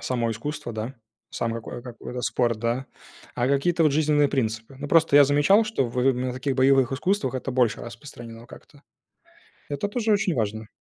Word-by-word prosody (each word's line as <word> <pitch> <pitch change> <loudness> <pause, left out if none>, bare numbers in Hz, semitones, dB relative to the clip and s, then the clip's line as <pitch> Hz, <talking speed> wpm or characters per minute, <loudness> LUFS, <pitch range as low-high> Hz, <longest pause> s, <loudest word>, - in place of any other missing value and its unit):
Само 120 -3 -1
искусство, 145 +3 -5
да, 110 +4 -5 0.4
сам 115 -1 -2
какое 115 +1 -7
какой-то 125 0 -7
спорт, 120 -3 0
да, 120 +4 -2 0.5
а 120 +1 0
какие-то 165 +5 +2
вот 155 -3 +4
жизненные 150 -1 +3
принципы. 115 -1 -2
Ну, 145 +1 -6
просто 160 -3 +4
я 145 - +9
замечал, 145 +10 +4
что 215 - -1
в 125 +3 +2
на 125 0 -3
таких 130 +2 -2
боевых 135 -1 +3
искусствах 190 +6 -1
это 130 +1 -3
больше 125 -3 +1
распространено 115 -1 -10
как-то. 140 +2 -16 0.9
Это 145 +7 -2
тоже 220 +1 0
очень 200 -4 +1
важно. 110 -2 -2
130 Hz, 170 wpm, -25 LUFS, 120-145 Hz, 0.9 s, я